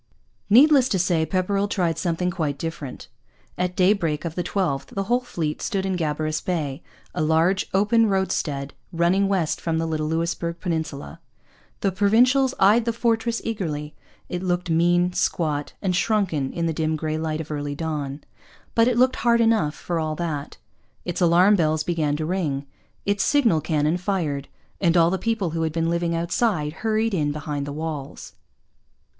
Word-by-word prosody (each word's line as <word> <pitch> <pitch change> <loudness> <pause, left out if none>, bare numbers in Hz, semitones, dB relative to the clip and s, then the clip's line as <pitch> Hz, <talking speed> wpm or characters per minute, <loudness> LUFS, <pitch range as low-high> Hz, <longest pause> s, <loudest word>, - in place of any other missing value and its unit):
Needless 265 +3 +6
to 195 - +1
say, 170 -3 +1
Pepperrell 195 +2 0
tried 175 -5 0
something 175 +1 -1
quite 155 -5 -2
different. 150 -4 -6 0.5
At 180 0 -2
daybreak 180 -5 +2
of 165 - -3
the 180 - -2
12th 175 -6 -1
the 195 - -3
whole 240 +5 +2
fleet 165 -11 -4
stood 195 -3 -1
into 185 -3 -1
Gabarus 155 0 -2
Bay, 155 -5 -2 0.3
a - - -2
large 160 +5 +2
open 210 +4 +3
roadstead 150 -8 -1 0.2
running 175 +4 +2
west 185 -5 0
from 165 -1 -1
the 165 - 0
little 155 -1 -2
Louisbourg 170 +1 -2
peninsula. 160 - -4 0.6
The 195 - +1
Provincials 245 +7 +3
eyed 215 +4 +5
the 230 - 0
fortress 230 0 0
eagerly. 155 -9 -3 0.3
It 180 - -4
looked 180 -1 -1
mean, 175 +2 +3
squat, 150 -5 -1
and 185 -2 +1
shrunken 180 -10 0
in 170 - -2
the 165 - 0
dim 155 0 0
grey 155 0 -2
light 155 -1 -2
of 160 -1 -6
early 145 -1 -3
dawn. 150 -3 -4 0.5
But 230 0 +4
it 245 -2 +1
looked 255 +1 +3
hard 235 -1 +3
enough, 225 -10 +2
for 170 -2 -3
all 155 -1 -2
that. 150 -4 -4 0.5
Its 175 +1 -3
alarm 180 +4 +5
bells 155 -3 +1
began 155 -4 0
to 155 - -2
ring. 155 -6 -2 0.4
Its 200 0 +1
signal 235 - +3
cannon 155 +1 +1
fired. 170 -7 -2 0.3
And 170 -2 +3
all 165 0 +5
the 190 - -1
people 220 -5 -1
who 165 0 -2
had 160 -1 0
been 165 +1 0
living 170 0 0
outside 170 -2 0
hurried 220 0 +1
in 150 -5 +1
behind 145 -1 -4
the - - -4
walls. 150 -2 -6
170 Hz, 170 wpm, -23 LUFS, 155-195 Hz, 0.6 s, Needless